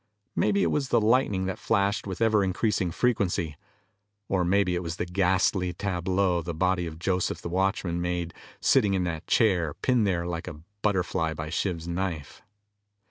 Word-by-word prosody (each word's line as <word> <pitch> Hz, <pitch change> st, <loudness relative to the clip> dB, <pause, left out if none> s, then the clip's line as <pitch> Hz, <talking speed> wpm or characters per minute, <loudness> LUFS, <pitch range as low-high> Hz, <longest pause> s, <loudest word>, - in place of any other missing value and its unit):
Maybe 200 Hz, -1 st, +2 dB
it -, -, +1 dB
was 140 Hz, -3 st, -1 dB
the 120 Hz, -, +4 dB
lightning 105 Hz, -4 st, +2 dB
that 95 Hz, -1 st, -3 dB
flashed 100 Hz, +1 st, 0 dB
with 95 Hz, +3 st, -5 dB
ever 110 Hz, -2 st, +3 dB
increasing 95 Hz, 0 st, 0 dB
frequency. 90 Hz, -6 st, 0 dB, 0.7 s
Or 95 Hz, -2 st, +1 dB
maybe 90 Hz, +1 st, +2 dB
it 90 Hz, -, -1 dB
was 85 Hz, -1 st, -4 dB
the 90 Hz, -, -3 dB
ghastly 90 Hz, 0 st, +1 dB
tableau 95 Hz, -1 st, 0 dB
the 85 Hz, 0 st, -5 dB
body 90 Hz, +1 st, +1 dB
of 80 Hz, -1 st, -8 dB
Joseph, 90 Hz, +1 st, -1 dB
the -, -, -4 dB
watchman, 90 Hz, -1 st, 0 dB
made, 85 Hz, -1 st, -2 dB, 0.3 s
sitting 100 Hz, -2 st, +3 dB
in 95 Hz, -, +1 dB
that 85 Hz, -3 st, -4 dB
chair, 90 Hz, -9 st, +2 dB
pinned 125 Hz, -5 st, +1 dB
there 85 Hz, -3 st, 0 dB
like 85 Hz, 0 st, -4 dB
a 80 Hz, -4 st, -8 dB, 0.2 s
butterfly 90 Hz, -5 st, 0 dB
by 80 Hz, +1 st, -5 dB
Shiv's 85 Hz, -2 st, -2 dB
knife. 85 Hz, -4 st, -4 dB
90 Hz, 170 wpm, -27 LUFS, 85-100 Hz, 0.7 s, the